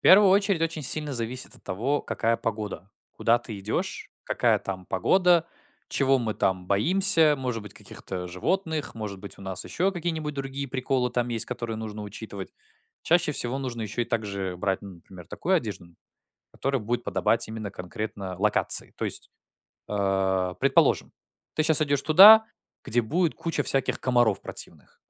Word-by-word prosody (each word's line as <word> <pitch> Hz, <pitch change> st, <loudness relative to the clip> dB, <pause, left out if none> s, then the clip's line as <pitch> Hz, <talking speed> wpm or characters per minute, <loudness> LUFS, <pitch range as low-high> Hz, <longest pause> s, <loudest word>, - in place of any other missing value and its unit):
первую 195 Hz, 0 st, +7 dB
очередь 200 Hz, -3 st, +3 dB
очень 165 Hz, -2 st, -2 dB
сильно 150 Hz, +2 st, -2 dB
зависит 125 Hz, +1 st, -4 dB
от -, -, -15 dB
того, 125 Hz, +10 st, -1 dB
какая 115 Hz, 0 st, 0 dB
погода. 105 Hz, -2 st, -5 dB, 0.2 s
Куда 120 Hz, +1 st, +2 dB
ты 115 Hz, -4 st, -8 dB
идёшь, 100 Hz, +3 st, -3 dB
какая -, -, +2 dB
там 95 Hz, -2 st, -6 dB
погода, 175 Hz, -, +3 dB, 0.4 s
чего 135 Hz, -1 st, +2 dB
мы 110 Hz, -3 st, -2 dB
там 95 Hz, -1 st, -1 dB
боимся, 165 Hz, -, +5 dB
может 125 Hz, -4 st, -3 dB
быть, 105 Hz, -1 st, -11 dB
каких-то 90 Hz, -1 st, -8 dB
животных, 160 Hz, -, -2 dB
может 105 Hz, -3 st, -6 dB
быть, 100 Hz, -, -10 dB
у -, -, -11 dB
нас 95 Hz, -1 st, -5 dB
ещё 190 Hz, +3 st, 0 dB
какие-нибудь 160 Hz, -4 st, -3 dB
другие 135 Hz, 0 st, -4 dB
приколы 130 Hz, -1 st, -1 dB
там 120 Hz, -1 st, -1 dB
есть, 115 Hz, -3 st, +1 dB
которые 120 Hz, -2 st, -4 dB
нужно 110 Hz, -1 st, -6 dB
учитывать. 100 Hz, -1 st, -8 dB, 0.5 s
Чаще 170 Hz, -1 st, +3 dB
всего 125 Hz, -1 st, -1 dB
нужно 125 Hz, -4 st, -4 dB
ещё 110 Hz, +3 st, -2 dB
и -, -, -2 dB
так 115 Hz, -2 st, -2 dB
же 95 Hz, -2 st, -4 dB
брать, 95 Hz, +1 st, -1 dB
ну, 100 Hz, -2 st, -9 dB
например, 90 Hz, 0 st, -14 dB
такую 190 Hz, -, -1 dB
одежду, 110 Hz, -, -2 dB
м, 85 Hz, -1 st, -20 dB, 0.6 s
которая 135 Hz, -1 st, -1 dB
будет 120 Hz, +3 st, -2 dB
подобать 100 Hz, +5 st, +1 dB
именно 110 Hz, -2 st, -5 dB
конкретно 95 Hz, 0 st, -6 dB
локации. 105 Hz, +1 st, +2 dB
То -, -, -3 dB
есть, -, -, -4 dB, 0.6 s
а, 95 Hz, -2 st, 0 dB
предположим, 90 Hz, -, +2 dB, 0.4 s
ты 155 Hz, -, +1 dB
щас 160 Hz, -1 st, +4 dB
идёшь 145 Hz, -2 st, 0 dB
туда, 210 Hz, +7 st, +9 dB, 0.4 s
где 120 Hz, -2 st, +1 dB
будет 165 Hz, +8 st, 0 dB
куча 165 Hz, -3 st, -2 dB
всяких 135 Hz, -, 0 dB
комаров 120 Hz, -5 st, +2 dB
противных. -, -, -9 dB
120 Hz, 165 wpm, -26 LUFS, 100-150 Hz, 0.6 s, туда